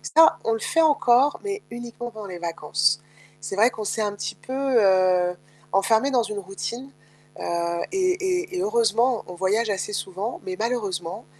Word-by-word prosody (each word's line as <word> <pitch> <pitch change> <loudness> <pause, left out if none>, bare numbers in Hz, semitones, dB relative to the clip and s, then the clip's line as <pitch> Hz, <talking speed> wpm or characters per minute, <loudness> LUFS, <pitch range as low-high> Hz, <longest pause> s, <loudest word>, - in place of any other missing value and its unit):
Ça, 320 0 +7
on 225 - +1
le 225 - -2
fait 330 - +5
encore, 260 +2 +3
mais 400 0 -3
uniquement 240 0 -7
pendant 215 -2 -8
les 180 - -7
vacances. 150 -2 0 0.4
C'est 155 +6 -5
vrai 225 +4 +5
qu'on 220 - -6
s'est 220 - -1
un - - -7
petit 205 - -5
peu, 260 - -9 0.3
heu, 185 -3 +3 0.4
enfermé 220 +7 +3
dans 245 -3 +3
une 205 - -3
routine, 235 +7 -5 0.5
heu - - -6 0.5
et 370 -1 +3 0.4
et 370 - -6
et - - 0
heureusement 425 - +3 0.2
on - - -8
voyage 215 +4 +2
assez 210 - -4
souvent 195 +5 -4
mais 185 0 -3
malheureusement, 200 -5 -3
220 Hz, 175 wpm, -24 LUFS, 185-250 Hz, 0.5 s, Ça